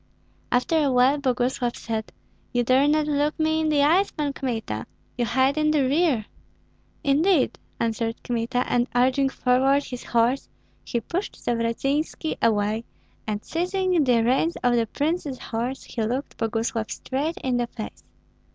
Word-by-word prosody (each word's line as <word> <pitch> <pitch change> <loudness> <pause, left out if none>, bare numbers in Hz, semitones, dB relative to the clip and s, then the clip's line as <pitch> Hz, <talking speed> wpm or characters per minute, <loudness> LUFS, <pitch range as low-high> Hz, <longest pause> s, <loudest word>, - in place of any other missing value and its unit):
After 250 +6 +2
a 285 -3 +2
while 255 +3 +4
Boguslav 250 -2 0
said, 220 -1 -4 0.4
"You 245 0 +2
dare 260 +4 +4
not 305 0 +3
look 295 +1 0
me 315 0 +2
in 315 - +1
the 290 -2 +3
eyes, 355 +7 +4
Pan 290 -2 -2
Kmita; 225 - -3 0.3
you 240 - 0
hide 260 +5 +2
in 305 0 +3
the 300 -2 +3
rear." 275 -4 +2 0.8
"Indeed!" 300 +2 +3 0.2
answered 230 0 -2
Kmita; 245 +1 -1
and 245 0 +1
urging 260 +2 +3
forward 265 +2 +2
his 250 -3 -7
horse, 240 +3 +1 0.3
he 235 - -2
pushed 355 - -3
Zavratynski 270 +7 -1
away, 215 0 +1 0.4
and 210 -1 -3
seizing 360 0 +1
the 245 -4 +3
reins 265 +8 +2
of 245 -1 +3
the 230 -1 +1
prince's 295 0 -2
horse, 245 +4 -4
he 235 - -5
looked 245 +6 -2
Boguslav 225 0 -2
straight 290 +6 -3
in 255 -2 +1
the 240 -1 0
face. 215 - -8
255 Hz, 150 wpm, -24 LUFS, 235-295 Hz, 0.8 s, while